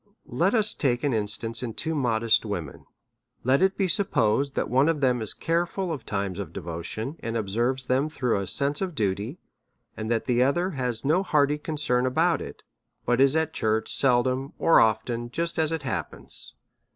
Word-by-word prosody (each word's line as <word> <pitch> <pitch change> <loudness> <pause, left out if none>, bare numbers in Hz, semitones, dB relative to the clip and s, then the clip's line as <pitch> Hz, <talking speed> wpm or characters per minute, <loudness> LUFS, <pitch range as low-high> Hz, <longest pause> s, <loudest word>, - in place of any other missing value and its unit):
Let 170 - +1
us 215 -2 +3
take 125 -4 0
an 145 -3 +1
instance 110 +2 -2
in 115 -3 -5
two 160 0 -2
modest 115 -6 +2
women: 90 -9 -6 0.6
Let 130 +3 +3
it 190 0 +2
be 195 - +2
supposed 140 - +1
that - - 0
one 135 +5 +3
of 165 -3 0
them 125 -3 +2
is 110 - -3
care 170 +1 0
ful 185 -1 -3
of 145 -6 -6
times 100 -2 -2
of 95 -6 -5
devotion, 90 - -5
and 115 0 -3
observes 120 +5 -1
them 130 +4 +1
through 125 -8 0
a 100 - -4
sense 145 - 0
of 185 -4 -3
duty, 105 - -1 0.6
and 110 0 -5
that 115 -1 0
the 125 -1 +2
other 175 +8 +2
has 125 -5 -3
no 160 +6 +3
hearty 150 -5 +2
con 155 +1 -4
cern 125 -4 +1
about 165 +6 +2
it, - - -9 0.4
but 120 +1 +2
is 135 +2 +5
at 160 0 0
church 110 0 0
seldom 130 +1 +2
or 165 - +5
often, 115 +2 +1
just 170 +6 -2
as 160 0 +2
it 160 -2 -2
happens. 130 - -5
130 Hz, 190 wpm, -26 LUFS, 115-155 Hz, 0.6 s, is